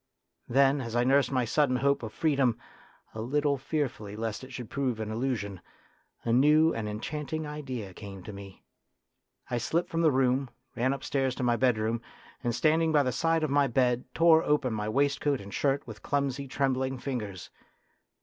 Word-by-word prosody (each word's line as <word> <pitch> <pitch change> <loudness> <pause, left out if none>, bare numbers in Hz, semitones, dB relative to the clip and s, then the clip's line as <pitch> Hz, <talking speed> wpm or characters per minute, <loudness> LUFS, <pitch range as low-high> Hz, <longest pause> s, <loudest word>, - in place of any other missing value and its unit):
Then, 135 +2 +4
as 115 -2 -5
I 120 - +3
nursed 135 +2 +3
my 130 -2 +1
sudden 130 +2 +2
hope 140 +2 +2
of 110 -2 -6
freedom, 135 -5 +1 0.6
a 110 - -5
little 140 +3 0
fearfully 130 -8 -3
lest 110 +1 -4
it 130 - -10
should 125 -3 -7
prove 130 -5 -1
an 110 0 -3
illusion, 110 -6 -2 0.6
a 115 - 0
new 150 +5 +5
and 110 -2 -3
enchant 145 +9 -5
ing 155 0 -2
idea 130 -10 -6
came 95 -1 -9
to 105 - -8
me. 100 -1 -11 0.9
I 120 - 0
slipped 170 +8 -1
from 165 - 0
the 160 - +5
room, 130 0 +2 0.3
ran 130 +3 +1
upstairs 135 -1 -1
to - - -4
my 120 -1 +3
bedroom 115 -2 +1 0.4
and, 120 -1 0
stand 155 +3 +3
ing 165 -1 +2
by 150 -2 +4
the 130 - 0
side 165 +4 +1
of 155 - 0
my 140 0 +4
bed, 125 0 +1
tore 165 -1 +6
open 145 -6 +1
my 105 0 -2
waistcoat 140 +2 +1
and 100 0 -10
shirt 140 0 0
with 110 -3 -10
clumsy, 140 -1 -1
trembling 130 0 0
fingers. 110 -8 -5
130 Hz, 185 wpm, -29 LUFS, 115-145 Hz, 0.9 s, tore